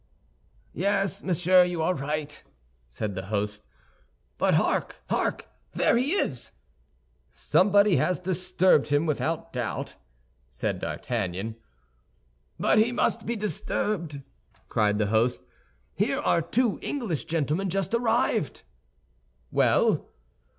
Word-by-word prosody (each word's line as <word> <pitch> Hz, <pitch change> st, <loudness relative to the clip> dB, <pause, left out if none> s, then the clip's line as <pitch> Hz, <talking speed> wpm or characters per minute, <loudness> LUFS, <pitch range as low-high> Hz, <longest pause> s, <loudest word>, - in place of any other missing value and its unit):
"Yes, 195 Hz, +1 st, 0 dB
monsieur, 180 Hz, 0 st, +4 dB
you 175 Hz, -2 st, -1 dB
are 180 Hz, -, +2 dB
right," 150 Hz, 0 st, -4 dB, 0.5 s
said 100 Hz, -, -4 dB
the 95 Hz, 0 st, -6 dB
host. 105 Hz, 0 st, -2 dB, 0.8 s
"But, -, -, +3 dB
hark, -, -, +1 dB, 0.2 s
hark! -, -, -1 dB, 0.3 s
There -, -, +3 dB
he 260 Hz, +7 st, +1 dB
is!" 135 Hz, -, -1 dB, 0.8 s
"Somebody 200 Hz, 0 st, +3 dB
has 180 Hz, -, +1 dB
disturbed 185 Hz, -3 st, +2 dB
him, 145 Hz, +2 st, +2 dB
without 165 Hz, +2 st, -2 dB
doubt," 120 Hz, -4 st, -4 dB, 0.5 s
said 60 Hz, -, -3 dB
D'Artagnan. 95 Hz, +4 st, -3 dB, 1.0 s
"But -, -, +3 dB
he 225 Hz, +3 st, +3 dB
must 230 Hz, -2 st, 0 dB
be 235 Hz, -, -1 dB
disturbed," 200 Hz, -7 st, -2 dB, 0.5 s
cried 105 Hz, -1 st, +2 dB
the 105 Hz, -, +1 dB
host; 110 Hz, -4 st, +2 dB, 0.5 s
"Here -, -, 0 dB
are -, -, +2 dB
two 225 Hz, +7 st, 0 dB
English 225 Hz, -, -3 dB
gentlemen 165 Hz, +4 st, -1 dB
just 195 Hz, +2 st, -2 dB
arrived." 230 Hz, -, +1 dB, 0.9 s
"Well?" -, -, +2 dB
170 Hz, 110 wpm, -26 LUFS, 130-200 Hz, 1.0 s, monsieur